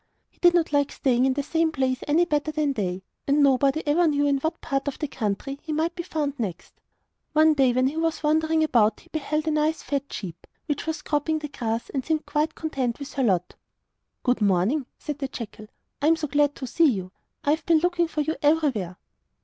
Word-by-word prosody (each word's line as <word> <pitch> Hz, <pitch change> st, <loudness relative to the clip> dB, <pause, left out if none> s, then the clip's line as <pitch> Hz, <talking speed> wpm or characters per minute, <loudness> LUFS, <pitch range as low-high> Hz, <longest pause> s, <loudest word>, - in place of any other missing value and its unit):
He -, -, -33 dB
did 350 Hz, 0 st, +5 dB
not 330 Hz, -3 st, +1 dB
like 285 Hz, -1 st, +2 dB
staying 255 Hz, -1 st, +2 dB
in 265 Hz, -, +2 dB
the 285 Hz, -, -1 dB
same 325 Hz, +2 st, +1 dB
place 260 Hz, -3 st, 0 dB
any 320 Hz, +4 st, +4 dB
better 300 Hz, -2 st, 0 dB
than 300 Hz, -2 st, 0 dB
they, 190 Hz, -5 st, -3 dB, 0.2 s
and 285 Hz, +1 st, +4 dB
nobody 275 Hz, +3 st, +3 dB
ever 325 Hz, +4 st, +3 dB
knew 290 Hz, -1 st, +2 dB
in 280 Hz, -1 st, +2 dB
what 315 Hz, +4 st, -2 dB
part 275 Hz, +1 st, -2 dB
of 285 Hz, -, -2 dB
the 300 Hz, -, -3 dB
country 260 Hz, +3 st, -3 dB
he 315 Hz, -, -6 dB
might 320 Hz, +3 st, 0 dB
be 350 Hz, -, -4 dB
found 295 Hz, -5 st, -3 dB
next. 190 Hz, -7 st, -5 dB, 0.6 s
One 310 Hz, 0 st, +5 dB
day, 270 Hz, -4 st, +3 dB
when 255 Hz, +1 st, +2 dB
we 280 Hz, +4 st, -1 dB
was 325 Hz, -1 st, -1 dB
wandering 315 Hz, +1 st, +2 dB
about 230 Hz, -8 st, +2 dB
he -, -, -22 dB
beheld 305 Hz, 0 st, -2 dB
a -, -, +2 dB
nice 305 Hz, +1 st, 0 dB
fat 280 Hz, -1 st, -3 dB
sheep, 175 Hz, -5 st, -7 dB, 0.2 s
which 295 Hz, +1 st, -3 dB
was 320 Hz, 0 st, -3 dB
cropping 310 Hz, +1 st, 0 dB
the 300 Hz, -1 st, -5 dB
grass 230 Hz, -3 st, -3 dB
and 270 Hz, -2 st, -2 dB
seemed 315 Hz, 0 st, -1 dB
quite 300 Hz, +2 st, -1 dB
contented 265 Hz, -7 st, -2 dB
with 280 Hz, -, -8 dB
her 270 Hz, -, 0 dB
lot. 180 Hz, -6 st, +1 dB, 0.7 s
'Good 250 Hz, -3 st, +1 dB
morning,' 205 Hz, -, +2 dB
said 295 Hz, -1 st, -5 dB
the 275 Hz, -, -2 dB
jackal, 215 Hz, -4 st, -8 dB, 0.3 s
'I 290 Hz, -, +2 dB
am 325 Hz, -, +5 dB
so 320 Hz, -2 st, -3 dB
glad 290 Hz, 0 st, +2 dB
to 265 Hz, -, -6 dB
see 320 Hz, +5 st, +3 dB
you. 190 Hz, -6 st, -3 dB, 0.3 s
I 285 Hz, -, +2 dB
have 315 Hz, -, -1 dB
been 335 Hz, -2 st, +5 dB
looking 345 Hz, +1 st, +1 dB
for 310 Hz, -1 st, -2 dB
you 315 Hz, +2 st, -1 dB
everywhere. 280 Hz, -, +1 dB
290 Hz, 220 wpm, -25 LUFS, 255-315 Hz, 0.7 s, did